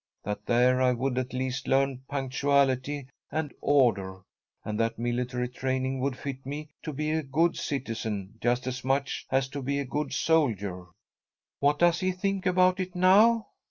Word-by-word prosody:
That 105 0 -5
there 125 +2 +4
I 125 -1 +4
would 125 +1 -1
at 130 0 -4
least 130 +1 -3
learn 135 -1 +2
punctuality 140 0 +1 0.3
and 150 -1 -2
order, 100 -9 +2 0.4
and 105 0 -3
that 115 0 0
military 125 +1 -1
training 130 +1 -2
would 130 0 -1
fit 135 -1 -6
me 145 +3 -6
to 155 - -5
be 150 +2 -2
a 160 0 +1
good 155 +4 +1
citizen 110 - -4
just 120 +1 +1
as 130 0 -4
much 135 +1 -1
as 135 0 +1
to 140 +1 -5
be 140 +2 -1
a 140 - -1
good 150 +4 -3
soldier." 105 - 0 0.7
"What 145 +1 +3
does 175 0 +4
he 185 0 +1
think 195 +1 -1
about 185 +1 +3
it 185 -1 -4
now?" 210 +5 +5
135 Hz, 165 wpm, -28 LUFS, 125-150 Hz, 0.7 s, now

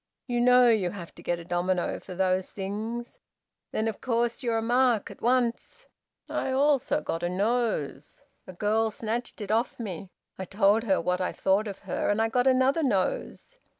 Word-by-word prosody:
You 240 -2 -1
know 250 0 +6
you 215 -6 +3
have 175 -3 -9
to - - -14
get 175 - -1
a 170 - -10
domino 175 +1 -1
for 185 - -10
those 185 0 +1
things. 215 +5 -5 0.5
Then, 220 - -1
of 220 - -4
course, 235 0 0
you're 235 -3 0
a - - 0
mark 240 -2 +2
at - - -14
once. 240 -1 0 0.4
I - - -2
also 280 +1 +2
got 165 - -3
a 175 - -1
nose. 200 - -1 0.3
A 185 - -8
girl 215 +4 +1
snatched 225 +2 -4
it 205 0 -4
off 230 +3 0
me. 195 -4 -6 0.3
I 190 - -3
told 205 +4 +2
her 195 -4 +2
what 180 +2 -1
I 180 - 0
thought 195 +3 +1
of 200 -2 -6
her, - - -1
and 205 +1 +1
I 225 0 +2
got 245 +3 +1
another 265 +4 +3
nose. 255 - -1
220 Hz, 185 wpm, -27 LUFS, 190-240 Hz, 0.5 s, know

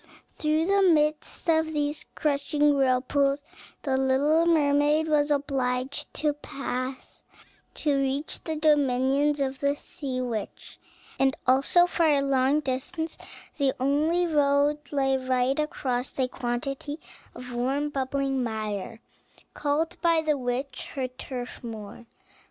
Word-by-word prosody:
Through 310 +1 0
the 395 +2 +3
midst 310 -1 +2
of 320 -1 +2
these 295 0 -2
crushing 295 0 +1
whirlpools 275 +2 +2 0.4
the 265 -2 +1
little 285 +5 +3
mermaid 300 -1 +3
was 300 -1 +2
obliged 270 -2 -1
to 300 -1 +1
pass, 260 -2 -5 0.5
to 290 -3 +1
reach 275 +2 -2
the 320 - -2
dominions 290 -1 +2
of 265 -1 -1
the 280 0 +1
sea 270 -3 -5
witch; 235 -5 -5 0.4
and 270 +1 +2
also 275 +7 +5
for 340 -2 +1
a 285 -2 +3
long 275 +2 +2
distance 290 +4 -3 0.4
the 275 -2 +2
only 305 +6 +2
road 290 -2 +2
lay 270 -2 +2
right 255 +1 0
across 260 -4 -2
a 260 -2 +2
quantity 265 +4 -4 0.4
of 250 0 -8
warm, 270 +5 0
bubbling 270 0 -1
mire, 220 -1 -4 0.5
called 300 +3 -1
by 335 -2 +3
the 305 -1 +2
witch 255 +1 -4
her 265 -2 -1
turfmoor. 240 -3 -8
280 Hz, 125 wpm, -26 LUFS, 260-300 Hz, 0.5 s, also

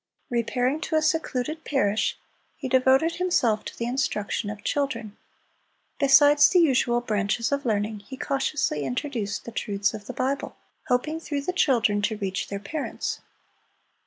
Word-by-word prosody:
Repairing 245 +5 0
to 320 - -2
a 310 - +4
secluded 310 -1 -1
parish, 215 -7 0 0.4
he 280 - -4
devoted 265 +5 +3
himself 245 -12 +1
to - - -8
the 235 - -2
instruction 235 -4 -1
of 210 0 -7
children. 235 -7 -2 0.8
Besides 290 +1 +6
the 370 - +3
usual 255 -7 +3
branches 215 +1 -1
of 280 -2 -1
learning, 210 0 0
he 260 +6 -10
cautiously 270 - -1
introduced 205 - -3
the 235 - -7
truths 205 -2 -1
of 210 -2 -8
the - - -5
Bible, 275 +2 -2 0.3
hoping 305 +6 0
through 290 -3 -3
the 360 +6 -3
children 230 -11 +2
to 215 +1 -1
reach 195 -2 -3
their 200 - -4
parents. 285 +9 -4
250 Hz, 150 wpm, -25 LUFS, 210-285 Hz, 0.8 s, Besides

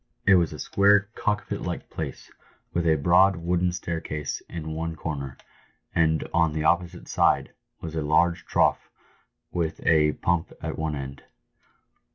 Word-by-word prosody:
It 100 - +6
was 85 -4 +4
a - - -7
square 100 +1 +3
cockpit 105 -3 -2
like - - -5
place, - - -6 0.4
with 85 -1 0
a 80 - +5
broad, 90 +6 +4
wooden 90 +1 0
staircase 80 -4 -4
in 80 -2 -5
one 80 +1 -3
corner, 70 -4 -5 0.6
and 80 -2 +2
on 85 -2 +3
the 75 0 -2
opposite 85 +2 0
side - - +2 0.3
was 80 -2 -6
a 80 - -1
large 85 +4 +2
trough - - +2 0.6
with 85 -2 -2
a 75 -2 +4
pump 85 -2 -1
at - - -4
one 80 -1 -1
end. 70 -1 -7
80 Hz, 150 wpm, -26 LUFS, 80-90 Hz, 0.6 s, It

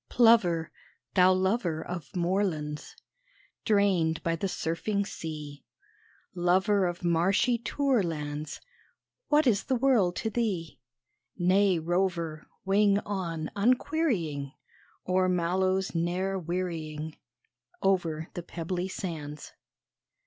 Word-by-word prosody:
Plover, 205 -9 +4 0.4
thou 185 0 +6
lover 185 -4 0
Of 175 -4 -7
moorlands 170 -5 -1 0.7
Drained 190 -6 +2
by 165 0 +1
the 180 +4 -2
surfing 200 +4 -1
sea 150 -6 -7 0.7
Lover 190 +2 +2
of 175 +1 -5
marshy 190 +8 +2
tourlands, 165 - -1 0.7
What 300 0 +4
is 215 -6 +2
the 260 - +1
world 235 -9 +3
to 220 - -2
thee? 200 -9 -2 0.6
Nay 190 +1 +3
rover, 170 -2 -1 0.2
wing 200 +1 +4
on 170 -6 -3
unquerying 205 - 0 0.5
O'er 185 0 +2
mallows 185 +2 +1
ne'er 180 +3 -1
wearying 160 -3 -4 0.7
Over 170 -5 +1
the 175 - -4
pebbly 175 +2 -4
sands! 155 -6 -6
180 Hz, 100 wpm, -28 LUFS, 165-200 Hz, 0.7 s, thou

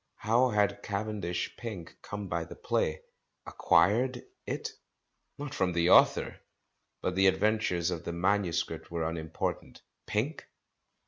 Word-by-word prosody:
How 120 +4 +3
had 105 -2 +1
Cavendish 100 -4 -3
Pink 105 -8 -7
come 100 -1 -6
by 85 -1 -1
the 80 - -10
play? 75 - -1 0.4
"Acquired" 120 +6 +2 0.2
it? - - -3 0.7
Not 145 0 -6
from 95 -9 0
the 85 +1 +3
author. - - +5 0.6
But 90 - 0
the 95 +1 +4
adventures 95 -3 +2
of 85 -1 -4
the 85 - -4
manuscript 85 -4 0
were 85 -1 -2
unimportant. 80 -1 -4 0.2
Pink 130 +10 -2
95 Hz, 125 wpm, -30 LUFS, 85-110 Hz, 0.7 s, author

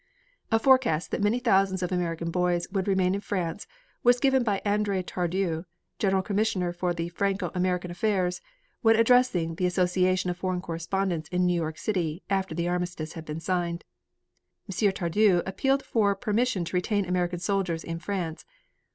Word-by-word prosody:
A 225 - +5
forecast 240 - +3
that - - -1
many 205 +4 +2
thousands 195 -6 +2
of 180 - -2
American 170 -2 -2
boys 175 -1 0
would 195 -1 -1
remain 190 -2 +2
in 200 - -2
France 185 -2 -3 0.3
was 245 0 +4
given 265 -1 +3
by 205 -4 0
Andre 205 -2 +1
Tardieu, 175 -1 -2 0.3
General 190 -2 +2
Commissioner 195 -3 0
for 175 0 -1 0.2
Franco 195 -2 -1
American 180 -1 -1
affairs, 180 -1 0 0.4
when 225 -1 +5
addressing 230 -8 +3
the 180 - +1
Association 185 0 +1
of 175 - -6
Foreign 185 0 -1
Correspondents 170 -1 -2
in 180 0 +1
New 180 - +3
York 160 -2 -2
City, 175 -5 -2
after 190 -4 0
the 170 +1 -1
armistice 175 -3 -3
had 165 -2 -8
been 150 +1 -5
signed. 170 0 -2 0.8
M. 200 +1 +1
Tardieu 185 0 +2
appealed 270 +8 0
for 205 -3 +2
permission 210 -1 0
to 175 - -5
retain 200 +2 +1
American 180 0 -1
soldiers 180 -2 -1
in 165 0 -5
France. 175 -4 -4
185 Hz, 160 wpm, -27 LUFS, 175-200 Hz, 0.8 s, A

